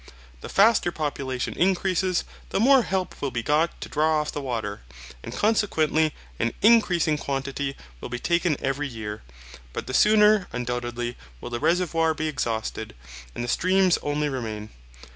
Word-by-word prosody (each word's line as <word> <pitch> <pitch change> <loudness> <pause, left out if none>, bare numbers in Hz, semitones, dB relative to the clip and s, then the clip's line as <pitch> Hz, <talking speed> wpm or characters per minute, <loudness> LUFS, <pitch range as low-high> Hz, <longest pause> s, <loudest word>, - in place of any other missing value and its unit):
The - - -9
faster 200 -3 +4
population 135 -5 -3
increases, 185 0 +1 0.3
the - - -1
more 265 +4 +6
help 190 -4 -3
will 140 - 0
be 120 -2 -3
got 155 +5 +1
to - - -5
draw 155 +1 +2
off 150 - -2
the 145 - -4
water, 115 -6 -4 0.4
and - - -8
consequently 160 - +1 0.2
an 115 - 0
increasing 175 -9 +4
quantity 140 0 -3 0.2
will - - -7
be 125 - -3
taken 170 +2 +1
every 140 +2 -1
year. 110 -4 -6 0.5
But - - -4
the 130 - -6
sooner, 210 +2 +5
undoubtedly, 120 0 -3 0.2
will 120 - -8
the 120 - -2
reservoir 165 0 +1
be 155 - -2
exhausted, 115 - -3 0.4
and - - -3
the - - -4
streams 185 +5 +3
only 145 +1 -1
remain. 110 -6 -5
150 Hz, 155 wpm, -25 LUFS, 125-180 Hz, 0.5 s, more